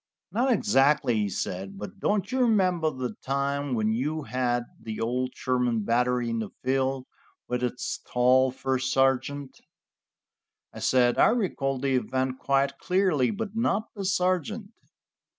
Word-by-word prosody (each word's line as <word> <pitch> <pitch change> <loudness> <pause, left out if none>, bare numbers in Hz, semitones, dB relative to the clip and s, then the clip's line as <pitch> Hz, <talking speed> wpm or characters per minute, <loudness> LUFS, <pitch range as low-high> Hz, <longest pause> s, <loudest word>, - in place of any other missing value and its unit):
"Not 245 +7 +1
exactly," 140 - +3
he 105 -2 0
said, 95 +1 -4
"but 105 +1 -8
don't 205 +1 0
you 260 - 0
remember 185 -9 +3
the 130 -5 -4
time 140 0 -1
when 110 -1 +1
you 150 +6 -2
had 120 -1 -1 0.2
the 110 -1 -6
old 125 +3 -1
Sherman 125 -3 0
Battery 125 +2 +1
in 115 - -1
the 110 -3 -4
field, 130 0 0 0.4
with 125 0 -2
its 125 0 -3
tall 130 +1 +4
first 130 0 -2
sergeant?" 135 +1 0 1.1
I - - -8
said: 125 -2 +3
"I - - +7
recall 175 - 0
the 135 +1 -1
event 130 +2 -2
quite 140 0 +1
clearly, 180 -9 +2
but 210 0 -4
not 225 -2 0
the 200 - -6
sergeant." 185 +3 0
130 Hz, 145 wpm, -27 LUFS, 125-170 Hz, 1.1 s, I